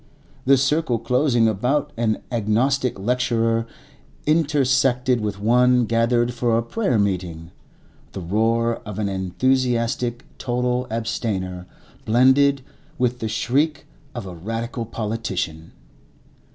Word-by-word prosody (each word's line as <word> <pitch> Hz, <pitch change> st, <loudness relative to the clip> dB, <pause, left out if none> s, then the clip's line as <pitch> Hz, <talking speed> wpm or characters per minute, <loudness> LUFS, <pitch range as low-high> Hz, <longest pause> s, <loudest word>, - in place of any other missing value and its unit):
The 135 Hz, +1 st, +6 dB
circle 135 Hz, -1 st, +1 dB
closing 120 Hz, 0 st, +2 dB
about 135 Hz, +8 st, 0 dB
an 110 Hz, -2 st, -1 dB
agnostic 120 Hz, +3 st, +1 dB
lecturer 115 Hz, +1 st, 0 dB, 0.6 s
intersected 130 Hz, -5 st, +2 dB
with 105 Hz, -1 st, -3 dB
one 125 Hz, +3 st, +4 dB
gathered 120 Hz, +2 st, +1 dB
for 120 Hz, -1 st, +1 dB
a 115 Hz, -, 0 dB
prayer 130 Hz, -, 0 dB
meeting; 90 Hz, -5 st, -2 dB, 0.6 s
the -, -, -5 dB
roar 115 Hz, +6 st, +1 dB
of 105 Hz, -2 st, -9 dB
an 105 Hz, -2 st, -1 dB
enthusiastic 120 Hz, +5 st, 0 dB
total 125 Hz, 0 st, -1 dB
abstainer 95 Hz, -5 st, -3 dB, 0.4 s
blended 130 Hz, +4 st, +4 dB, 0.3 s
with 125 Hz, 0 st, 0 dB
the 110 Hz, -, -2 dB
shriek 140 Hz, +6 st, 0 dB, 0.3 s
of 120 Hz, -4 st, -5 dB
a 95 Hz, -, -7 dB
Radical 115 Hz, +6 st, -4 dB
politician. 100 Hz, -8 st, -4 dB
115 Hz, 110 wpm, -22 LUFS, 110-125 Hz, 0.6 s, The